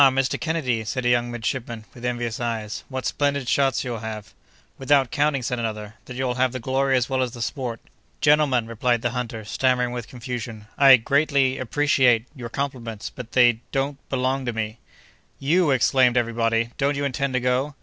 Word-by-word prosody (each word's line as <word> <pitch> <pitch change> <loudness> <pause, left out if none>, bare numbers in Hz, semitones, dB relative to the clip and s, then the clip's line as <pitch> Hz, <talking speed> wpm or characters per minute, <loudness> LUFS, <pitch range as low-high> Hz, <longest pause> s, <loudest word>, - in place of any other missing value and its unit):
Mr. 130 0 0
Kennedy," 145 -9 -1
said 125 +3 -3
a - - +3
young 120 0 +2
midshipman, 115 -1 -4
with 120 - -13
envious 120 0 -2
eyes, 115 -3 -3
"what 130 -1 -4
splendid 140 -3 0
shots 135 0 +2
you'll 120 -3 -4
have!" 105 -3 -7 0.5
"Without 135 -2 +3
counting," 145 -2 +1
said 125 0 -2
another, 110 -2 -4
"that 125 - -9
you'll 130 -1 -1
have 130 -1 +2
the 130 - -3
glory 135 +2 +1
as 125 - 0
well 130 -1 0
as 125 -2 -2
the 120 - -9
sport!" 120 -5 -4 0.4
"Gentlemen," 145 -5 +3
replied 115 +1 0
the 120 - 0
hunter, 115 -3 -4
stammering 125 +2 +1
with 120 -2 -5
confusion, 120 -3 -6
"I 135 -2 +8
greatly—appreciate—your 130 -2 +1
compliments—but 120 -3 -5
they—don't—belong 130 +2 +1
to 120 - -1
me." 110 +1 -4 0.6
"You!" 160 +4 +2
exclaimed 125 -1 +3
every 115 -1 +1
body, 115 0 +1
"don't 140 +1 +1
you 140 - -1
intend 140 0 -1
to 130 - +2
go?" 125 +4 0
125 Hz, 170 wpm, -23 LUFS, 115-135 Hz, 0.6 s, I